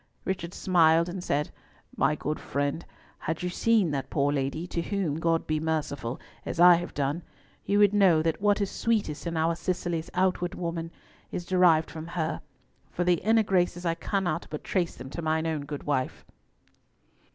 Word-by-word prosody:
Richard 180 -3 -3
smiled 170 -3 +4
and 180 0 -5
said—"My 150 0 -2
good 150 +1 -3
friend, 145 +4 -2 0.4
had 160 +2 -3
you 180 - 0
seen 210 -2 +2
that 135 -2 -3
poor 145 -1 +1
lady—to 155 +5 -2
whom 170 -5 -2
God 165 0 +1
be 155 0 0
merciful—as 150 -2 -4
I 175 0 +9
have 175 +1 -2
done, 145 +4 -1 0.4
you 200 - +2
would 205 -1 +5
know 185 -6 +5
that 165 +2 -1
what 205 0 +3
is 200 - -1
sweetest 205 -9 -1
in 165 -1 -2
our 165 +1 +2
Cicely's 170 -1 -2
outward 180 -1 +1
woman 170 -1 -3 0.4
is 175 - -4
derived 175 -4 +4
from 160 0 -7
her; 165 -2 -2 0.5
for 175 - -2
the 175 -2 +2
inner 220 +2 +4
graces, 180 -2 0
I 165 - +2
cannot 175 -1 -2
but 150 - -6
trace 180 -3 -1
them 130 - -9
to 170 - -5
mine 160 0 0
own 155 -3 -2
good 145 0 -6
wife." 130 -3 -2
170 Hz, 170 wpm, -27 LUFS, 155-180 Hz, 0.5 s, I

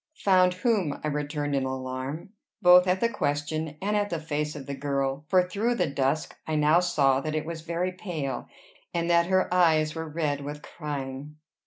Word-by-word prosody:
"Found 185 -2 +4
whom?" 185 - 0
I 155 - 0
returned 145 0 -2
in 135 - +1
alarm, 130 +5 -4 0.3
both 180 -1 +7
at 180 +1 +1
the 235 - +4
question 150 -4 -2
and 210 +1 0
at 205 0 +1
the 170 - -2
face 150 -1 -3
of 140 -2 -7
the 140 - -5
girl; 140 0 -2
for 185 -1 +5
through 210 +7 -1
the 180 - +1
dusk 140 +1 -1
I 155 - -1
now 150 +3 +4
saw 140 -7 +2
that 155 +1 -3
it 155 0 -1
was 165 -1 -5
very 170 +3 -2
pale, 170 -8 -4 0.5
and 170 0 0
that 170 0 +4
her 185 -1 +2
eyes 160 -4 +3
were 160 -1 -5
red 150 -2 -1
with 145 +1 -7
crying. 145 -1 -6
155 Hz, 190 wpm, -27 LUFS, 145-180 Hz, 0.5 s, both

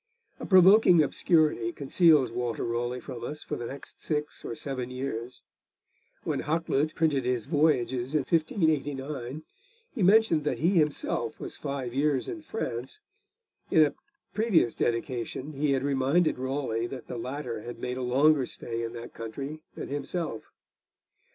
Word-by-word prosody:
A - - -6
provoking 185 -2 +7
obscurity 150 -6 +2
conceals 145 -1 +3
Walter 120 -1 -2
Raleigh 120 +1 -2
from 125 -2 -8
us 150 +1 -5
for - - -4
the 120 - -5
next 140 +3 -9
six 150 -1 -3
or 115 - -5
seven 130 -2 -4
years. 125 - -5 0.8
When - - -1
Hakluyt 155 -1 0
printed 155 -4 +2
his 125 -3 -1
Voyages 135 -4 +1
in 150 - +4
1589 145 - -1 0.5
he 240 - -5
mentioned 190 -4 +5
that 150 - -1
he 165 - +2
himself 150 - 0
was - - -6
five 140 -4 -4
years 140 -1 +1
in 335 - -5
France. 130 - -5 0.7
In 155 - +6
a 145 - -2 0.4
previous 210 - +3
dedication 120 +4 -2
he 140 0 +1
had 135 -1 0
reminded 140 +3 +2
Raleigh 130 -3 -2
that 130 -1 -8
the 125 - -6
latter 125 -3 -4
had 120 +2 -7
made 125 0 -4
a - - -3
longer 135 +2 +3
stay 115 -1 -5
in 115 0 -4
that 120 0 -8
country 140 +7 -6
than - - -6
himself. 145 -3 -4
140 Hz, 150 wpm, -28 LUFS, 125-155 Hz, 0.8 s, provoking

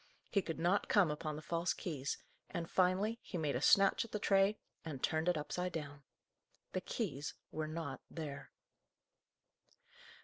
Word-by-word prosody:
He 200 - +4
could 165 -3 -4
not 175 +4 +2
come 190 -7 +5
upon 150 0 -3
the 155 - -7
false 170 +2 0
keys, 145 -6 -3 0.3
and, 170 -1 -3
finally, 190 +6 +2
he 185 - -5
made 150 -5 0
a 125 - 0
snatch 195 - +6
at 230 - -11
the - - 0
tray, 200 0 +4 0.3
and 145 -5 -6
turned 160 +2 +2
it 175 - +2
upside 180 +5 -2
down. 145 -3 -5 0.7
The - - -1
keys 140 +2 -3 0.2
were 155 0 -2
not 165 +1 -4
there. 150 -4 -6
165 Hz, 160 wpm, -36 LUFS, 150-190 Hz, 0.7 s, snatch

